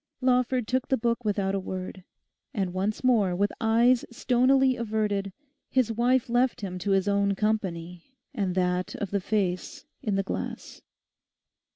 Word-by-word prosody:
Lawford 250 -2 +1
took 255 +1 0
the 265 - +2
book 235 +1 -1
without 200 -2 0
a 195 - 0
word. 185 0 -6 0.5
And 190 -4 -1
once 200 +5 -2
more, 215 -8 +3
with 200 +3 +1
eyes 235 +2 +4
stonily 255 +2 +3
averted, 210 -4 -1 0.4
his 255 -4 +2
wife 245 +3 +2
left 245 +1 +1
him 185 -2 -5
to 200 - -3
his 195 0 +2
own 200 0 +2
company 185 -2 -2 0.2
and 195 -7 -1
that 180 0 0
of 200 - -4
the 200 -1 0
face 185 -3 -2 0.2
in 210 -6 -1
the 195 - +1
glass. - - -6
210 Hz, 155 wpm, -27 LUFS, 190-240 Hz, 0.5 s, eyes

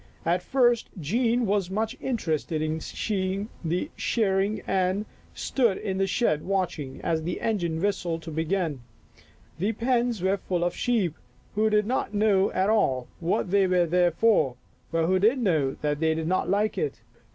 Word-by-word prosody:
At 175 +2 +2
first 240 +2 +2
Jean 235 - +1
was 200 -3 0
much 215 +3 -2
interested 165 - -1
in 155 +1 -1
seeing 195 +3 -2
the 170 +2 -1
shearing 200 -2 0
and 190 +2 0 0.3
stood 235 -8 +1
in 195 -3 -3
the 195 - +2
shed 170 -7 +1
watching, 180 -8 -2
as 160 -1 0
the 175 +2 -3
engine 175 -8 -1
whistled 175 -4 -1
to 165 - -7
begin. 160 -2 -1 0.8
The 205 +6 0
pens 235 -3 0
were 190 +1 +2
full 180 -2 -2
of 175 - -1
sheep 215 -10 +1 0.4
who 215 +1 +2
did 210 -1 +3
not 230 -2 -1
at 195 -2 +2
all 205 -12 +3
know 125 - -17
what 175 +1 -1
they 200 -1 +4
were 180 -1 +3
there 175 +1 +3
for, 170 - +2 0.4
but 165 0 +1
who 185 +2 +2
did 220 +7 +4
know 160 - +1
that 150 -1 0
they 160 0 +2
did 160 0 -2
not 185 +2 0
like 205 +3 +1
it. 450 - -3
190 Hz, 170 wpm, -26 LUFS, 165-215 Hz, 0.8 s, they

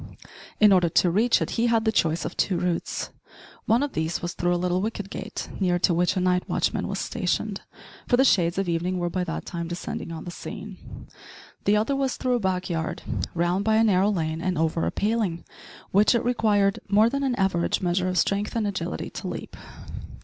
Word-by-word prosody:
In 210 -2 +7
order 175 -2 +4
to 175 +2 +3
reach 225 +6 +3
it - - -5
he 240 - +3
had 230 -1 +2
the 220 - +3
choice 165 -6 +1
of - - -5
two 185 - +1
routes. 175 -2 -2 0.6
One 230 +5 +3
of 290 - -3
these 160 +1 -1
was 175 0 -4
through 175 0 0
a - - +1
little 180 +1 0
wicket 205 -2 -4
gate, - - -5
near 180 -2 +2
to 175 0 +2
which 175 +2 +1
a - - +3
night 180 0 +1
watchman - - 0
was - - -3
stationed - - -2 0.5
for 245 - +3
the 265 - +5
shades 170 -8 +3
of 195 -1 0
evening 175 +2 -1
were 175 -1 -1
by 185 0 -1
that 165 - -4
time 170 -2 -4
descending 170 -1 -5
on 165 - -6
the 175 - -6
scene, - - -9 0.6
the 205 +1 +4
other 220 +6 +1
was 270 -2 -1
through 255 -1 0
a - - -3
back 185 -3 -1
yard, 165 -2 -3 0.3
round 175 +3 +1
by 220 +1 +2
a 220 - +5
narrow 200 -2 +3
lane 160 -5 -1
and 185 0 -1
over 160 +1 0
a - - -1
paling, 205 -5 -1 0.5
which 205 +5 +4
it 235 - 0
required 210 -5 +2
more 210 +3 +5
than 275 +4 -1
an 265 -3 0
average 190 -4 +1
measure 180 +1 +1
of 180 - -2
strength 200 +5 0
and 225 -2 +1
agility 180 -4 -3
to - - -6
leap. - - -6
185 Hz, 215 wpm, -25 LUFS, 175-215 Hz, 0.6 s, In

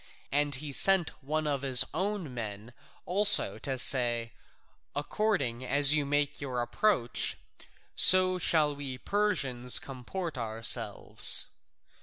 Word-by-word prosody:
And 145 0 +1
he 145 +2 -7
sent 190 +1 +4
one 155 +3 -4
of 140 -3 -3
his 130 -3 +4
own 185 -4 -4
men 110 0 -8 0.3
also 185 - +2
to 135 +3 -6
say, 120 -3 0 0.6
"According 145 - -3
as 140 +3 +5
you 145 -2 -1
make 145 0 -3
your 130 -3 -5
approach, 125 - -2 0.6
so 185 0 +4
shall 155 -3 0
we 135 -3 -8
Persians 130 -11 +1
comport 140 +4 -7
ourselves." 115 0 +1
140 Hz, 115 wpm, -28 LUFS, 125-170 Hz, 0.6 s, as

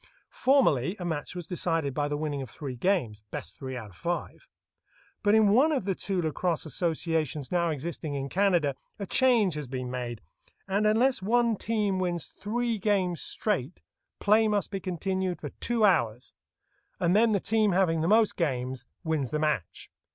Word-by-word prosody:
Formerly 195 - +3
a 180 - -5
match 160 0 -3
was 175 -2 -5
decided 165 -5 -1
by 145 +1 0
the 145 0 -2
winning 145 -2 -2
of 130 - -7
three 130 +5 -6
games, 120 - 0
"best - - -7
three 130 -2 -5
out 110 -4 -8
of - - -19
five;" 175 0 -4 0.7
but 205 +1 +4
in 220 -2 +5
one 260 +10 +5
of 270 -10 0
the 195 - +1
two 190 +1 -2
lacrosse 165 +1 -1
associations 160 -2 -1
now 170 -1 +2
existing 155 0 -4
in 135 0 -3
Canada 175 -5 +2 0.2
a 200 - -4
change 230 -5 +3
has 150 -2 -5
been 125 -1 -4
made, 120 -3 -4 0.5
and 200 +2 +2
unless 240 +2 +3
one 235 +3 +2
team 205 -3 0
wins 175 -3 -1
three 230 +2 -2
games 190 -4 +1
straight, 180 - -2 0.4
play 215 +2 +4
must 205 -2 0
be 195 - -2
continued 185 0 -2
for - - -5
two 235 -2 +2
hours, 120 - +1 0.7
and 175 +2 +2
then 225 +1 +5
the 200 - +2
team 215 0 +2
having 170 -4 +2
the 165 - +1
most 215 +2 +4
games 130 -5 -2 0.2
wins 155 -6 -1
the 155 - -1
match. 150 - -2
175 Hz, 175 wpm, -28 LUFS, 145-205 Hz, 0.7 s, in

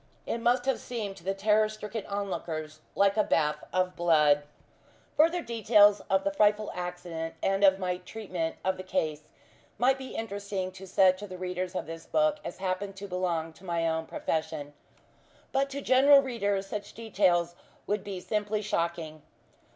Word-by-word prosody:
It 235 - -2
must 245 +1 +2
have 270 -1 +1
seemed 215 -5 -5
to 170 - -14
the 195 +2 -1
terror 215 +2 +3
stricken 215 0 -6
onlookers 160 -6 -4 0.2
like 200 +1 +3
a 215 - +5
bath 150 -4 +1
of 185 0 0
blood. 150 -4 +4 0.7
Further 335 +3 +3
details 210 -3 +5
of 190 0 +3
the 200 - 0
frightful 210 +1 +3
accident, 175 -2 -5
and 195 +1 +1
of 190 -1 +6
my 180 -1 -2
treatment 180 -3 -4
of 190 0 +1
the 185 - -6
case, 155 -5 -2 0.5
might 260 +4 +3
be 260 -1 -8
interesting 200 -3 -3
to 190 +1 -11
such 185 0 +4
of 205 - -7
the 185 - -7
readers 180 0 -4
of - - -2
this 165 +1 -8
book 305 -1 +2
as - - -6
happen 190 +1 -2
to 195 +1 -8
belong 175 -3 -2
to 185 - -19
my 170 -2 0
own 160 0 -1
profession; 145 -2 -3 0.8
but 275 +1 +1
to 280 +1 -5
general 275 +2 +6
readers 205 -6 -1
such 205 +1 -6
details 185 -6 +1 0.3
would 205 -1 -1
be 195 -2 -5
simply 210 +2 -2
shocking. 170 -5 -2
195 Hz, 170 wpm, -29 LUFS, 175-215 Hz, 0.8 s, of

